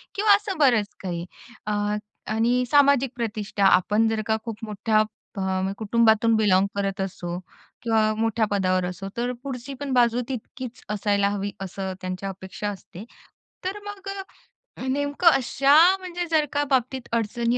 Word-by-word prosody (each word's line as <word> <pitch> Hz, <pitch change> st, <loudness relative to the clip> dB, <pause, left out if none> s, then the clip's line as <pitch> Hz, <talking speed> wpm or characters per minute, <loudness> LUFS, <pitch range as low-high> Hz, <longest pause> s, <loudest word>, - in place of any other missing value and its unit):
किंवा 410 Hz, 0 st, +6 dB
असं 405 Hz, -3 st, -4 dB
बरंच 235 Hz, -8 st, +3 dB
काही 175 Hz, -2 st, -3 dB, 0.4 s
अ, 210 Hz, 0 st, 0 dB, 0.4 s
आणि 240 Hz, +3 st, +2 dB
सामाजिक 280 Hz, -3 st, +5 dB
प्रतिष्ठा 210 Hz, -3 st, -3 dB
आपण 210 Hz, +4 st, +4 dB
जर 220 Hz, -1 st, -1 dB
का 220 Hz, -, +1 dB
खूप 225 Hz, -3 st, -5 dB
मोठ्या 215 Hz, +1 st, +1 dB, 0.3 s
फ -, -, -5 dB, 0.4 s
कुटुंबातून 225 Hz, 0 st, +3 dB
बिलोंग 200 Hz, -2 st, +3 dB
करत 195 Hz, 0 st, -1 dB
असो 175 Hz, -2 st, -4 dB, 0.5 s
किंवा 220 Hz, -2 st, +2 dB
मोठ्या 225 Hz, 0 st, +1 dB
पदावर 185 Hz, -2 st, +1 dB
असो. 195 Hz, +2 st, -5 dB
तर 245 Hz, +1 st, 0 dB
पुढची 270 Hz, 0 st, -6 dB
पण 285 Hz, -2 st, -4 dB
बाजू 240 Hz, 0 st, +3 dB
तितकीच 255 Hz, 0 st, -7 dB
असायला 200 Hz, -1 st, +1 dB
हवी 200 Hz, 0 st, -3 dB
असं 190 Hz, 0 st, -4 dB
त्यांच्या 185 Hz, +1 st, -4 dB
अपेक्षा 190 Hz, +2 st, -5 dB
असते. 190 Hz, -1 st, -9 dB, 0.6 s
तर 395 Hz, +2 st, -3 dB
मग 405 Hz, -1 st, -8 dB, 0.7 s
अ, -, -, -9 dB
नेमकं 285 Hz, +5 st, 0 dB
अशा 275 Hz, +2 st, +3 dB, 0.2 s
म्हणजे 355 Hz, -1 st, -4 dB
जर 310 Hz, -2 st, +3 dB
का 290 Hz, 0 st, +2 dB
बाबतीत 260 Hz, -1 st, 0 dB
अडचणी 235 Hz, +2 st, 0 dB
225 Hz, 145 wpm, -24 LUFS, 200-260 Hz, 0.7 s, किंवा